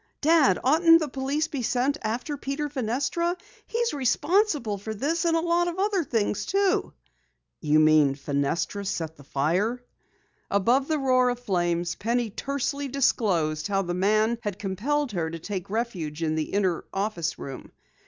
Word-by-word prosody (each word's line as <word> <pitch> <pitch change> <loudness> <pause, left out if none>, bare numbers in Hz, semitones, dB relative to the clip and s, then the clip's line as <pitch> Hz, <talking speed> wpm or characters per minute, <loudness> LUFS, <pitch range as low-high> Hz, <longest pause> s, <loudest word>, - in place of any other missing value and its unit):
"Dad, 300 - +4
oughtn't 330 +5 +6
the 310 - -2
police 275 +3 -1
be 285 -4 -4
sent 260 +5 0
after 240 +7 -3
Peter 285 +2 -3
Fenestra? 285 +7 -1 0.3
He's 470 -3 -1
responsible 290 - +1
for 220 +2 -5
this, 325 - -1
and 330 -1 +3
a - - +1
lot 345 +1 +1
of 345 0 -3
other 395 -2 +1
things, 220 -7 -1
too!" 395 -1 +1 0.7
"You 150 +1 +3
mean 155 -3 +5
Fenestra 145 +7 -2
set 160 -4 -3
the 145 - -15
fire?" 175 - 0 0.7
Above 240 +8 +2
the 315 - +1
roar 255 -2 +3
of 245 -1 -2
flames, 175 -6 0
Penny 235 0 -1
tersely 280 +4 -3
disclosed 185 - +1
how 195 -1 0
the 175 -1 -3
man 215 +5 +2
had 205 -4 -4
compelled 240 +9 -1
her 170 -5 -2
to 165 - -6
take 185 +2 -5
refuge 180 -9 -3
in 155 -1 0
the 155 -1 -2
inner 190 -4 0
office 195 -5 -2
room. 135 -1 -8
230 Hz, 160 wpm, -26 LUFS, 175-290 Hz, 0.7 s, oughtn't